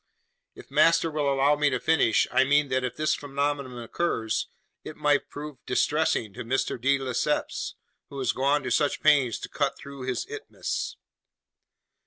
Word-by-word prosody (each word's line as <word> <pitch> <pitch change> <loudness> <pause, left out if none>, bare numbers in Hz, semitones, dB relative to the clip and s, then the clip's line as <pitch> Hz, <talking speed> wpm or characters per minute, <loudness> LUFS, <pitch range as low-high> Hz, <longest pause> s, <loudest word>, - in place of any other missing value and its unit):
"If - - -14
master 165 0 +4
will 150 -2 0
allow 140 +2 +3
me 150 0 +2
to 130 -2 -1
finish, 150 -8 +3
I 130 +1 +4
mean 145 +1 +3
that 130 0 0
if 125 - -3
this 155 0 +1
phenomenon 140 -2 -2
occurs, 115 -1 -2 0.4
it 155 - -8
might 145 -1 +1
prove 150 -1 -8
distressing 150 -9 +1
to - - -6
Mr. 125 0 -1
de 140 +2 +3
Lesseps, 130 -3 -2 0.3
who 140 - -9
has 130 - +1
gone 140 +2 +1
to 130 - -3
such 145 +4 +1
pains 130 -6 +4
to - - -5
cut 140 -2 -1
through 140 -2 -9
his 130 - -2
isthmus!" 440 0 -5
140 Hz, 165 wpm, -26 LUFS, 130-150 Hz, 0.4 s, master